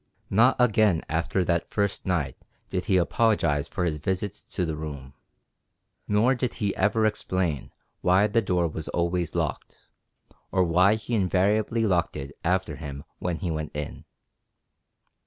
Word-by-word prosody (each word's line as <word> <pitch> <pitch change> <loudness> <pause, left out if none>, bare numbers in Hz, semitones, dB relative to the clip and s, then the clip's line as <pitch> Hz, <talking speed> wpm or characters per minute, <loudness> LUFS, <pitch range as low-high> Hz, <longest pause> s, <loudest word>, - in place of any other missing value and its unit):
Not 120 +6 +5
again 110 -7 +3
after 85 +4 0
that 85 0 0
first 100 -2 -1
night 75 -8 0 0.3
did 90 - -2
he 95 -4 +3
apologize 90 -6 +2
for 90 - -2
his 80 -3 -1
visits 95 +5 -2
to 90 - -2
the 80 -2 -2
room, 70 -4 -7 0.9
nor 110 +5 +3
did 125 -2 -2
he 100 -2 -1
ever 110 +3 +2
explain 95 - -1 0.3
why 95 +3 +4
the 110 +2 +2
door 90 -4 +1
was 80 -1 -6
always 85 0 -1
locked, - - -3 0.7
or 95 - +3
why 90 +5 +4
he 110 +2 -6
invariably 105 +3 +2
locked 90 -6 +1
it 70 0 -7
after 90 -3 0
him 70 -2 -7 0.2
when 90 -1 -1
he 85 0 -3
went 80 -1 -4
in. 75 0 -5
90 Hz, 150 wpm, -26 LUFS, 80-105 Hz, 0.9 s, Not